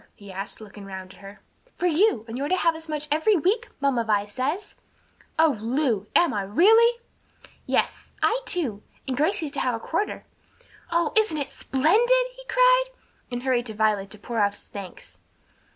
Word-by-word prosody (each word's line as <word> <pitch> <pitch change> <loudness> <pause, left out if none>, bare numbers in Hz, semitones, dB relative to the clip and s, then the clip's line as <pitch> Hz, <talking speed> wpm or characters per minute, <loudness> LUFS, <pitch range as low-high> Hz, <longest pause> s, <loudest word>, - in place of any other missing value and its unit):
he 200 -1 -12
asked, 195 +2 -6
looking 210 -1 -11
round 190 -1 -8
at - - -18
her. 200 +1 -12 0.4
"For - - -2
you; 345 - +3
and 225 - -6
you're 280 +3 -2
to 370 - +3
have 335 -2 +2
as 320 0 -8
much 300 -1 -1
every 320 +8 +3
week, 375 +7 +1
Mamma 275 -4 +1
Vi 210 -2 +1
says." 275 - -3 0.6
"O 315 -3 +4
Lu! 230 -3 0
am 345 - +4
I, 205 - -1
really?" 445 - +4 0.7
"Yes; - - -1
I 475 +3 +2
too; 260 - 0 0.3
and 260 - -1
Gracie's 310 +1 0
to 285 - -4
have 250 -2 0
a - - -5
quarter." 335 - -3 0.7
"Oh, 335 -2 +1
isn't 435 -8 +3
it 285 - -2
splendid!" 460 - +2
he - - -12
cried, - - +5 0.5
and 245 0 -4
hurried 250 -2 +1
to 220 - -6
Violet 210 -2 +1
to 215 - -8
pour 230 +2 -4
out 205 -1 +2
his - - -12
thanks. 195 -3 -10
275 Hz, 185 wpm, -25 LUFS, 215-355 Hz, 0.7 s, cried